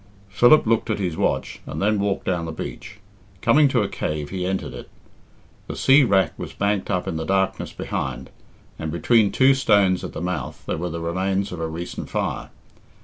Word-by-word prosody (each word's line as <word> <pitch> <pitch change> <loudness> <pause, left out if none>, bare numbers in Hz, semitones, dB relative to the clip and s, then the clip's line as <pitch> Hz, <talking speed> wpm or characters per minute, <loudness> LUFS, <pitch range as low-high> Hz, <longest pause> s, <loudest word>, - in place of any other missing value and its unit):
Philip 120 +10 +5
looked 115 0 +1
at 110 - 0
his 90 -5 -2
watch - - -1
and - - -5
then 105 +1 +2
walked 100 -1 -1
down 90 -3 -1
the 80 - -4
beach. 95 +5 -7 0.4
Coming 150 +8 +5
to 125 -5 +2
a - - -1
cave, 75 -5 -4
he 90 -1 -2
entered 95 0 -3
it. - - -9 0.8
The - - -5
sea 135 +2 +5
wrack 95 -6 +2
was - - -6
banked 100 -1 -1
up 90 -3 -1
in 80 - -2
the 80 - -3
darkness 95 +2 0
behind, 65 0 -4 0.5
and 80 -1 -3
between 105 +5 +3
two 135 +1 +5
stones 100 -8 +3
at - - -6
the - - -5
mouth 85 -7 -4
there - - -2
were 90 +1 -2
the 85 0 -5
remains 95 +4 -1
of 90 - -6
a 80 - -2
recent 85 +2 -6
fire. - - -3
95 Hz, 200 wpm, -23 LUFS, 85-105 Hz, 0.8 s, Philip